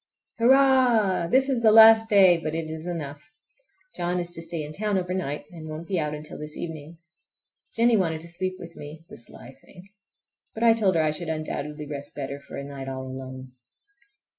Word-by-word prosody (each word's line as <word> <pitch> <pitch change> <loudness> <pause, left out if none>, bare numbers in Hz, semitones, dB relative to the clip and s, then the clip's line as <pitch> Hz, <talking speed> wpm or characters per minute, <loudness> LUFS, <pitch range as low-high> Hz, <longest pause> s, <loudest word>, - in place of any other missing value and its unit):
Hurrah! 245 -7 +4
This 265 +5 +3
is 260 -4 0
the 220 -2 +5
last 225 0 +8
day, 195 -4 +6
but 160 -1 -4
it 165 -1 -3
is 160 +2 -7
enough. 150 -4 -6 0.7
John 175 +1 -1
is 175 0 -2
to 165 - -5
stay 165 -1 -4
in 150 +1 -8
town 210 +2 -1
over 180 -1 -2
night, 150 -6 -3
and 160 -3 -9
won't 155 +2 -7
be 190 -3 -1
out 150 -1 -2
until 150 0 -8
this 150 0 -6
evening. 160 0 -7 0.8
Jennie 230 0 +4
wanted 165 -5 -1
to 170 - -10
sleep 185 +2 -3
with 165 - -11
me—the 155 +3 -11
sly 120 +2 -9
thing! 185 +1 -16 0.7
but 220 - -3
I 230 -1 +7
told 205 -5 +2
her 160 - +3
I 155 - +1
should 160 +2 -4
undoubtedly 150 -1 -4
rest 145 -1 -6
better 140 0 -5
for 140 - -10
a 140 - -5
night 140 -1 -7
all 130 0 -5
alone. 130 0 -8
165 Hz, 195 wpm, -25 LUFS, 150-195 Hz, 0.8 s, last